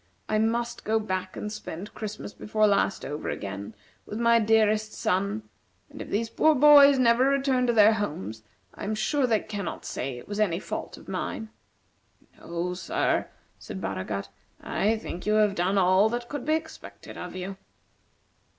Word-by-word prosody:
I 215 - +1
must 235 +2 -1
go 220 +1 +1
back 185 -3 -4
and 210 - -4
spend 195 0 -7
Christmas 210 -1 -6
before 215 0 +1
last 200 -1 +1
over 150 +2 -4
again, 100 +2 -5 0.3
with 210 - -5
my 235 0 +5
dearest 215 -1 +2
son; 200 +4 -1 0.5
and - - -9
if - - -7
these 225 +3 0
poor 310 +7 +3
boys 285 0 +8
never 245 0 +4
return 270 -2 +2
to 240 - +3
their 215 0 +6
homes, 110 - -4 0.3
I - - -9
am 215 +2 -1
sure 255 +5 +1
they 220 -3 +2
cannot 205 -5 -5
say 130 -1 -4
it 120 - -11
was 205 0 -4
any 190 -6 +2
fault - - -6
of - - -15
mine." 220 - -4 0.9
"No, 170 +1 -3
sir," 180 - 0 0.3
said 95 - -7
Baragat, 100 +1 -4 0.3
"I 220 +2 0
think 195 -3 -7
you 215 - +3
have 210 -2 +4
done 190 +2 0
all 190 +3 +4
that 240 +1 -4
could 290 -3 -5
be 310 - +4
expected 320 0 -8
of 180 0 -7
you." 190 +1 -5
215 Hz, 170 wpm, -27 LUFS, 185-230 Hz, 0.9 s, boys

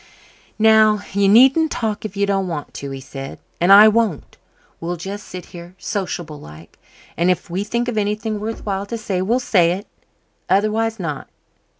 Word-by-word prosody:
"Now, 215 -1 +5
you 200 0 +3
needn't 270 +9 +5
talk 220 -2 -3
if 210 -1 -6
you 200 - +2
don't 195 -1 0
want 155 -4 -5
to," 140 - -6
he 135 0 -6
said. 135 +1 -8 0.2
"And 175 +3 +3
I 205 +2 +10
won't. 215 -7 0 0.4
We'll 175 +1 -3
just 195 +4 -7
sit 180 -1 -8
here, 175 +1 -11
sociable 175 -8 -4
like, 75 +2 -14 0.4
and 170 +3 +1
if 180 0 -1
we 185 +3 -1
think 235 +3 -2
of 230 -3 -1
anything 210 +1 -2
worth 220 +2 -5
while 200 -1 -3
to 230 - -4
say 195 -4 -2
we'll 230 +7 +1
say 175 -8 +3
it. 195 +4 -6 0.6
Otherwise, 215 +3 +1
not. 150 -6 -5
200 Hz, 180 wpm, -20 LUFS, 175-220 Hz, 0.6 s, I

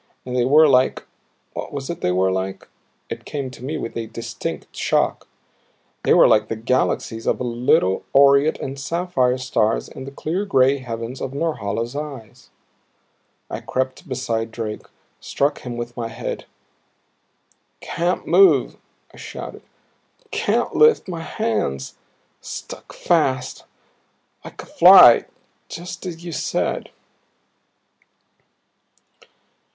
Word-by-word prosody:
And 125 0 -5
they 125 -1 +2
were 155 +4 +6
like 130 -2 +2 0.5
what - - -6
was 140 -2 -5
it 170 - -7
they 90 - +1
were 95 +1 +2
like? 95 +1 -4 0.4
it - - -7
came 140 -3 -5
to 125 -1 -13
me 150 +4 -3
with 115 - -6
a 115 -1 -4
distinct 115 -9 -6
shock. - - 0 0.7
They - - 0
were - - +7
like 105 0 +3
the 115 - -3
galaxies 115 -1 -1
of - - +1
little 120 -6 +1
aureate 140 +2 +5
and 135 +1 -6
sapphire 140 -5 0
stars 120 -4 0
in 130 - -9
the 135 - -8
clear 165 +7 -3
gray 135 -8 +3
heavens 115 0 -6
of 135 +1 -5
Norhala's 120 -6 -2
eyes. 140 -8 -8 1.0
I - - -5
crept 130 +5 -3
beside 115 -3 -2
Drake, 110 -2 -6 0.3
struck 145 +1 -1
him 120 -1 -7
with 120 0 -6
my 120 -2 -3
head. 115 +2 -6 1.3
"Can't 175 +2 -2
move," 390 -1 +4 0.4
I - - -15
shouted. - - -8 0.7
"Can't - - 0
lift 460 - +5
my 170 -3 -5
hands. 100 - -2 0.4
Stuck - - -9
fast 135 -7 0 0.8
like - - -10
a - - -13
fly - - +8 0.4
just 175 +2 -7
as 170 -1 -8
you 170 - -5
said." - - -2
130 Hz, 125 wpm, -21 LUFS, 115-145 Hz, 1.3 s, fly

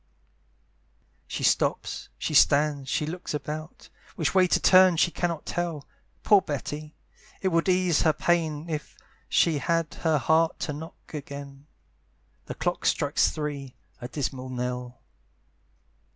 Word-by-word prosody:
She - - -5
stops, - - 0
she - - -3
stands, 145 -2 +4
she 150 - 0
looks 170 0 -5
about, 155 +3 -6 0.3
Which 160 - 0
way 185 -1 +5
to - - +2
turn 185 -2 +6
she 170 - +3
cannot 170 -3 -2
tell. 170 -5 -3 0.4
Poor 205 -2 +6
Betty! 150 -1 -5 0.4
it 190 - 0
would 165 +1 +1
ease 180 -3 +3
her 160 - +4
pain 160 -1 0
If 155 -2 -5 0.3
she 160 -4 +3
had 165 +1 0
heart 160 +1 +2
to 150 - -2
knock 160 +3 -11
again; 140 -1 -8 0.8
The - - -5
clock - - -1
strikes - - +2
three 145 -4 -5 0.2
a 120 - -6
dismal 130 -1 -4
knell! 125 -1 -5
155 Hz, 130 wpm, -26 LUFS, 140-170 Hz, 0.8 s, turn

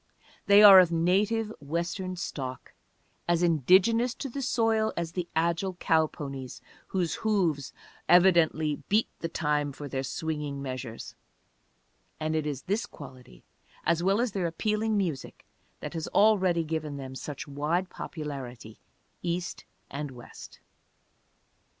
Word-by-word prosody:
They 200 +1 +8
are 195 -2 +11
of 180 -2 +4
native 205 +6 +1
Western 170 +5 -3
stock, 130 -7 -6 0.5
as 170 0 +2
indigenous 190 - +3
to 275 - -5
the 275 +3 -5
soil 225 -3 +1
as 170 -1 -2
the 175 0 -4
agile 170 +3 0
cow 160 -2 +2
ponies 135 -4 -7 0.3
whose 180 -4 -1
hoofs 180 -11 0 0.4
evidently 170 -4 +4
beat 215 +3 +2
the 165 - -3
time 150 -2 0
for 145 +1 -8
their 135 -1 -3
swinging 150 -1 -4
measures; 130 -4 -6 1.1
and 155 0 -1
it 155 -1 -1
is 140 -3 -4
this 205 +4 -1
quality, 130 - -13 0.4
as 170 0 +2
well 195 +4 +2
as 240 -1 0
their 190 -3 -1
appealing 215 +5 -1
music, 170 -9 -3 0.4
that - - -6
has 165 -2 -4
already 190 -5 +3
given 155 -2 -4
them 130 -1 -7
such 140 +2 -7
wide 150 +6 -1
popularity, 130 -8 -7 0.4
East 175 +1 -3 0.3
and 145 +1 -4
West. 125 -2 -12
165 Hz, 130 wpm, -28 LUFS, 145-190 Hz, 1.1 s, are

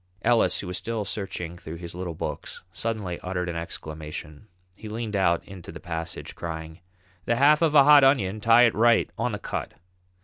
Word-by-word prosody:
Ellis, 120 -2 +3
who - - -7
was 90 0 -4
still 110 +2 -3
searching 90 -3 -5
through 85 -2 -8
his 85 0 -8
little 90 -2 -5
books, - - -6
suddenly 105 -6 -3
uttered 90 -1 -3
an 85 - -3
exclamation. 80 0 -7 0.3
He 105 +3 -10
leaned 110 -1 -4
out 85 -3 +2
into 95 -3 -10
the 80 - -9
passage, 80 -2 -6
crying: 80 0 -6 0.5
"The 120 - +1
half 145 +5 +5
of 160 -2 +2
a 140 - +9
hot 145 0 +8
onion; 110 -7 +3
tie 115 +2 +6
it 115 - +4
right 115 +1 +3
on - - -1
the - - -3
cut." - - -5
95 Hz, 190 wpm, -26 LUFS, 85-115 Hz, 0.5 s, a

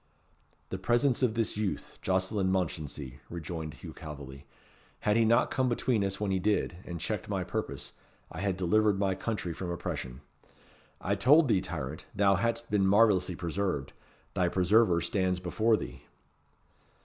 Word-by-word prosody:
"The 95 - -4
presence 120 +7 +2
of 120 -4 +2
this 115 -2 0
youth, 105 -2 -3
Jocelyn 95 +1 +1
Mounchensey," 75 -7 -3
rejoined 80 -2 -5
Hugh 80 0 -9
Calveley. 70 -4 -9 0.5
"Had 105 - +2
he 115 - +4
not 115 +3 +3
come 130 -1 +1
between 120 -2 +1
us 95 0 -2
when 105 -2 -1
he 95 - +1
did, 100 -3 0
and 85 -1 -5
checked - - -3
my - - -1
purpose, - - -4 0.4
I 80 - -7
had 100 -2 0
delivered 105 +3 +3
my 95 -1 +1
country 95 -3 -3
from 90 +2 -5
oppression. 65 -7 -4 0.8
I 100 - -1
told 140 +10 +5
thee, 95 -4 +3
tyrant, 80 -5 -5
thou 100 0 +4
hadst 115 +4 -1
been 100 -2 +3
marvellously 100 -3 +4
preserved. 85 -4 -2 0.4
Thy 90 -1 +2
preserver 95 0 +4
stands 95 -1 0
before 110 +5 +2
thee." - - -7
95 Hz, 155 wpm, -30 LUFS, 85-110 Hz, 0.8 s, told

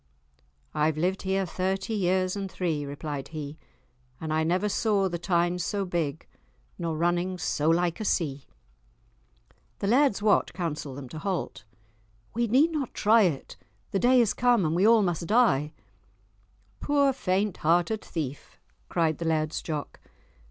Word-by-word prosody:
"I've 155 0 +1
lived 185 +4 0
here 190 0 0
thirty 190 +4 -2
years 185 -2 +1
and 195 -2 -4
three," 160 -7 -2
replied 145 -1 -5
he, 155 -1 -7 0.6
"and 160 -1 -3
I 160 0 +2
never 180 +5 +1
saw 205 -1 +1
the 175 -2 -4
Tyne 175 0 +1
so 195 +3 -1
big, 165 -4 -2 0.5
nor 165 -2 -2
running 175 +2 0
so 155 -2 0
like 170 +2 +1
a - - -3
sea." 145 -8 -1 1.3
The - - -4
Laird's 250 +1 +3
Wat 210 -1 +2
counselled 150 -6 -4
them 140 -2 -7
to 155 - -7
halt. 185 - -3 0.7
"We 235 +1 0
need 275 +9 +4
not 290 -6 -3
try 220 +2 +5
it, 165 -9 -1 0.3
the 195 - +1
day 250 +3 +5
is 230 -4 +3
come 235 -10 +2
we 185 +5 +3
all 225 -2 +6
must 175 -2 -1
die!" 200 - +3 1.1
"Poor 285 -2 +2
faint 200 -5 -1
hearted 175 +7 +1
thief!" 145 -4 -6 0.3
cried 160 -3 0
the 170 - -3
Laird's 155 -1 0
Jock. 150 -3 -5
180 Hz, 150 wpm, -27 LUFS, 155-205 Hz, 1.3 s, all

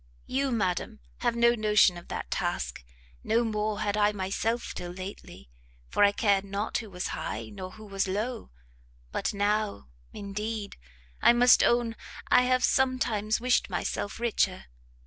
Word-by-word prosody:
You, 270 +1 -1
madam, 215 0 -1 0.2
have 240 -1 0
no 235 0 +5
notion 210 -5 +4
of 175 - -10
that - - -5
task: - - -2 0.4
no 230 +2 +2
more 215 -1 -1
had 205 -1 0
I 210 0 +3
myself 210 +4 -2
till 175 - -6
lately, 185 - -9 0.4
for - - +2
I 200 - +6
cared 200 -2 +2
not 200 +2 -2
who 220 - -8
was 180 -1 -4
high, - - -4
nor 185 -2 -7
who 215 - -12
was 195 -1 -1
low: 220 +6 -3 0.6
but - - -1
now, 205 - -1 0.2
indeed, 210 +1 -5 0.5
I - - +7
must 245 +1 +6
own 235 -1 +2 0.3
I 250 - +5
have 255 0 +2
some 265 -1 +3
times 215 -3 0
wished 245 -2 +2
myself 195 +3 -3
richer! 210 -5 0
210 Hz, 155 wpm, -28 LUFS, 200-235 Hz, 0.6 s, I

